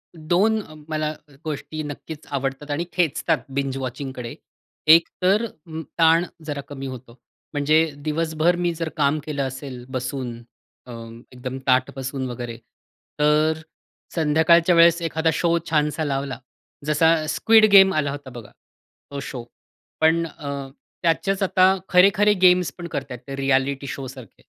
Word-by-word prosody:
2 185 +7 +1
अ, 155 - -14 0.2
मला 155 -1 -1
अ, 150 -1 -16
गोष्टी 155 0 -5
नक्कीच 150 +1 -8
आवडतात 135 +1 -3
आणि 160 +4 -1
खेचतात 170 -6 +1 0.2
बिंज 135 -1 -2
वॉचिंगकडे. 130 -2 -6 0.5
एक 165 +1 +7
तर 200 +5 +3
अ, 165 -6 -13 0.3
ताण 165 +1 +5 0.2
जरा 145 -2 -4
कमी 135 -1 -7
होतो. 130 -2 -9 0.4
म्हणजे, 155 +2 +3
दिवसभर 155 +3 0
मी 175 -1 -1
जर 165 0 -4
काम 150 0 +2
केलं 145 -3 -2
असेल 130 -1 -8
बसून, 130 -1 -4 0.5
अ, 125 - -11 0.4
एकदम 125 +1 -6
ताठ 130 0 +3
बसून 135 -1 -4
वगैरे, 120 -1 -6 0.6
तर 150 +1 +3
अ, 160 - -12 0.5
संध्याकाळच्या 165 +2 +4
वेळेस 170 0 +6
एखादा 160 0 0
शो 170 +1 +1
छानसा 150 0 +1
लावला, 135 -1 -3 0.5
जसा, 160 +2 +4
स्क्विड 220 +6 +5
गेम 190 -1 +8
आला 145 -2 0
होता 140 -2 -8
बघा. 120 -4 -11 0.6
तो 140 - -4
शो. 130 -3 -6 0.6
पण 165 +1 +3
अ, 140 -3 -6 0.4
त्याचेच 195 +4 +1
आता 185 0 +4
खरे-खरे 200 +3 +5
गेम्स 180 -1 +5
पण 175 -1 -6
करताहेत. 135 -5 -5
ते 135 - -5
रिएलिटी 135 0 0
शो 135 -1 -5
सारखे. 130 -4 -12
150 Hz, 145 wpm, -23 LUFS, 135-165 Hz, 0.6 s, गेम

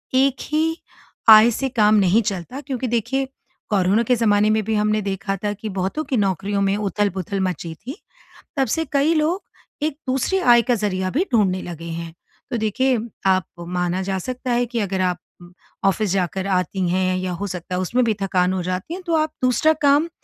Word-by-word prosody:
एक 270 0 +3
ही 320 +2 +1 0.5
आय 220 +1 +9
से 270 +4 -2
काम 215 -4 +3
नहीं 200 +2 +4
चलता 200 +5 -4
क्योंकि 260 -3 -3
देखिए 240 +4 0 0.4
कोरोना 200 +2 +2
के 250 +2 +2
ज़माने 210 -2 +3
में 215 0 +1
भी 220 +2 -2
हमने 210 0 +1
देखा 195 0 -2
था 205 - 0
कि 210 +1 -7
बहुतों 190 +12 -1
की 265 -2 -1
नौकरियों 200 0 0
में 195 0 +2
उथल-पुथल 200 -1 -1
मची 175 -3 -3
थी, 245 - -8 0.6
तब 270 -1 +2
से 325 0 -1
कई 285 +3 +3
लोग 320 +5 0 0.4
एक 305 -2 -1
दूसरी 265 +9 +1
आय 240 -8 +6
का 245 +2 +1
ज़रिया 190 -3 -1
भी 330 +9 +1
ढूँढने 190 -5 +2
लगे 170 -1 -8
हैं। 165 0 -6 0.4
तो 245 - 0
देखिए 245 +4 +1 0.3
आप 185 -2 +3 0.2
माना 180 +1 -1
जा 190 0 -2
सकता 255 +5 -4
है 240 0 +2
कि 240 0 -3
अगर 195 -3 -1
आप 180 -1 0 0.7
ऑफ़िस 195 0 +1
जाकर 190 0 -1
आती 185 0 0
हैं 185 +1 +1
या 185 0 -3
हो 195 +3 -4
सकता 180 -1 -5
है 180 - -1
उसमें 245 +7 +1
भी 225 - +2
थकान 185 -1 +1
हो 190 - -1
जाती 185 - -3
है, 370 - -6
तो 340 -2 -1
आप 310 0 +1
दूसरा 255 +5 +4
काम 290 +3 +4
210 Hz, 195 wpm, -21 LUFS, 185-255 Hz, 0.7 s, आय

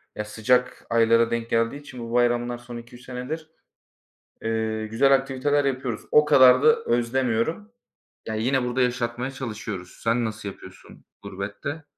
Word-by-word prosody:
ya 105 - -4
sıcak 125 +4 0
aylara 115 0 +3
denk 115 0 -2
geldiği 115 +4 +1
için 135 -3 -11
bu 115 0 -6
bayramlar 120 0 +1
son 120 0 -9
2-3 120 +1 -12
senedir, 130 +6 -6 0.9
eee, 110 -1 -2
güzel 135 +6 +3
aktiviteler 135 +2 0
yapıyoruz. 130 -4 -2
O 150 - +6
kadar 130 -2 +6
da 230 - +7
özlemiyorum. 120 - 0 0.6
Ya 110 - -3
yine 125 +4 +1
burada 125 +1 -1
yaşatmaya 125 +1 -1
çalışıyoruz. 110 -8 -7
Sen 115 +1 +1
nasıl 110 -2 -5
yapıyorsun 95 -1 -14 0.2
gurbette? 105 +10 -6
120 Hz, 140 wpm, -24 LUFS, 115-130 Hz, 0.9 s, da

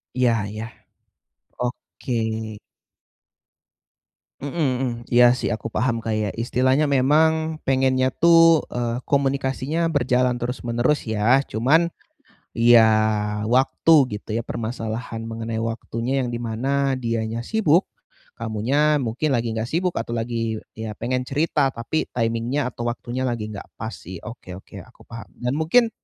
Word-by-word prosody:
Iya 125 -2 +3 0.2
iya. 110 +1 -5 1.0
Oke. 125 +1 -5 2.3
Heeh 140 -1 -5
heeh. 130 -6 0 0.2
Iya 120 0 +6
sih 125 - -2
aku 110 - -4
paham 120 0 +1
kayak 110 -2 -2
istilahnya 130 +5 +2
memang 155 +4 +2
pengennya 130 -1 +2
tuh, 165 -2 +6
eee, 120 0 -2
komunikasinya 140 +3 0
berjalan 125 -4 +1
terus-menerus 120 +2 -1
ya. 110 +5 +3
Cuman 140 +9 +2 0.7
ya, 115 -1 +6 0.6
waktu 135 +6 +3 0.2
gitu 105 - -8
ya 115 - -2
permasalahan 115 0 -4
mengenai 115 0 -4
waktunya 115 +3 -2
yang 120 - -3
dimana 130 +4 -1
dianya 115 -2 -2
sibuk, 180 - +2 0.5
kamunya 135 +7 +1
mungkin 130 +5 -1
lagi 115 -1 0
enggak 110 0 -2
sibuk 175 +5 -1
atau 120 - -4
lagi 115 -1 -2 0.2
ya 110 -1 -5
pengen 125 +3 -2
cerita 145 -1 +1
tapi 115 +7 -2
timing-nya 120 +3 -1
atau 120 0 -6
waktunya 120 +2 -3
lagi 115 -3 -3
enggak 100 -2 -8
pas 110 0 -5
sih. 95 -5 -10
Oke, 110 -6 -9
oke, 95 - -11
aku - - -15
paham. 115 -2 -10 0.2
Dan 125 +4 -1
mungkin 225 +9 +3
125 Hz, 125 wpm, -23 LUFS, 115-140 Hz, 2.3 s, Iya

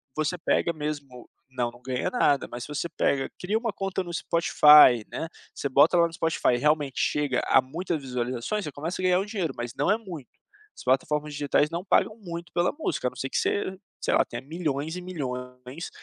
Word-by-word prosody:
você 155 +3 0
pega 170 0 +1
mesmo 145 -5 -6 0.2
Não, 125 -2 -2
não 120 - -17
ganha 130 0 -2
nada, 145 - +2
mas 120 0 -6
se - - -9
você 150 +3 -3
pega, 135 -1 0
cria 200 +4 -2
uma 230 -1 -2
conta 195 -1 -2
no 175 - -8
Spotify, 150 -8 +6
né, 165 - -4 0.3
você 140 - -3
bota 145 +6 +5
lá 170 0 +5
no 165 - -13
Spotify 165 -6 +1
e - - +2
realmente 145 0 +1
chega 145 -3 +1
a - - +5
muitas 160 +4 -4
visualizações, 125 - -3
você 150 - -5
começa 160 +7 -4
a - - -4
ganhar 180 0 +4
um 195 - -2
dinheiro, 195 -9 -3
mas 120 0 -5
não 145 - 0
é 210 - +3
muito, 175 - -9 0.5
as - - -11
plataformas 150 +4 0
digitais 145 +1 +1
não 170 +4 -4
pagam 215 +3 +2
muito 170 -4 -8
pela 175 +1 +2
música, 300 - -1
a - - +1
não - - -19
ser 135 - -4
que - - -2
você, 190 -2 -1 0.2
sei - - 0
lá, - - +4
tenha 120 +1 -7
milhões 155 +1 -3
e - - -6
milhões, 125 -3 -6
150 Hz, 215 wpm, -26 LUFS, 130-175 Hz, 0.5 s, Spotify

